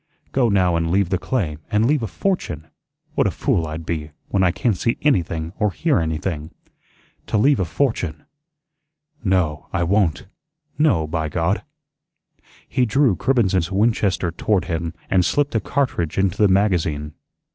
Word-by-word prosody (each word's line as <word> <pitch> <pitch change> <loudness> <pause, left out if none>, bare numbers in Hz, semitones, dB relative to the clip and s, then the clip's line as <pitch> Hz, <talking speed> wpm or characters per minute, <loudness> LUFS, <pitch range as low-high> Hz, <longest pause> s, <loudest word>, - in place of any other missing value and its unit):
"Go 125 -3 +2
now 90 -4 +3
and 85 0 -1
leave 95 0 +2
the 95 -2 0
claim, 85 - -2
and 105 +1 +2
leave 145 +2 +2
a 110 - -2
fortune! 90 - -2 0.5
What - - +2
a - - +2
fool 80 -2 0
I'd 80 +1 -6
be, 80 -2 -3 0.2
when 100 - +1
I 95 - +4
can't 95 +5 0
see 115 +6 0
anything 85 - 0
or 105 - +2
hear 155 - +1
anything. 80 -1 -3 0.8
To - - 0
leave 140 +5 +4
a 95 - +1
fortune! 90 - -1 1.0
No, 90 -7 0
I 85 - 0
won't. 90 -2 +1 0.5
No, 125 - +3
by 80 0 -2
God!" 85 +6 0 1.1
He 130 - +1
drew 125 -2 +3
Cribbens's 95 -8 +1
Winchester 100 -3 +1
toward 95 +2 0
him 85 -1 -3
and 90 -1 +3
slipped 145 +9 +1
a 110 - +2
cartridge 105 - -1
into 95 -2 +1
the 105 - +6
magazine. 85 -7 +1
95 Hz, 155 wpm, -21 LUFS, 80-110 Hz, 1.1 s, the